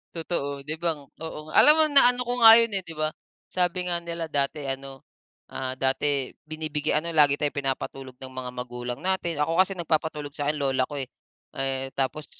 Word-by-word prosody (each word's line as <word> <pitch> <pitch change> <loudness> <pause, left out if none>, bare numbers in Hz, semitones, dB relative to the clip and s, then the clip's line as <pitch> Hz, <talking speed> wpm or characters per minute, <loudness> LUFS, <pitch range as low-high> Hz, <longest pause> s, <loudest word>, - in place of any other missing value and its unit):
Totoo, 140 -4 -4
'di 155 - -4
ba? 165 -3 0 0.2
Oo, 155 -1 -7
alam 300 - +8
mo 315 - +5
na 280 -4 +6
ano 250 0 -1
ko 245 0 -2
nga 225 0 +10
'yun, 230 -2 +2
eh, 195 - -1
'di 165 -3 -10
ba, 155 0 -1 0.3
sabi 180 0 -1
nga 175 -1 0
nila 170 -1 -5
dati 145 -1 -1
ano, 135 0 -5 0.5
ah, 130 0 -4
dati 135 0 +1 0.2
binibigyan 155 0 -1
ano 170 - -4
lagi 145 -2 +5
tayong 145 -1 -1
pinapatulog 135 -2 -4
ng 130 0 -8
mga 130 -1 -5
magulang 125 0 -6
natin, 175 -4 0
ako 165 +4 +2
kasi 190 0 -1
nagpapatulog 155 -3 -2
sa 145 -1 -2
'kin 150 - -1
lola 135 -2 0
ko, 145 - -6
eh. 135 - -2 0.5
Eh, 135 -1 -2
tapos 135 +2 -2
150 Hz, 195 wpm, -25 LUFS, 135-170 Hz, 0.5 s, nga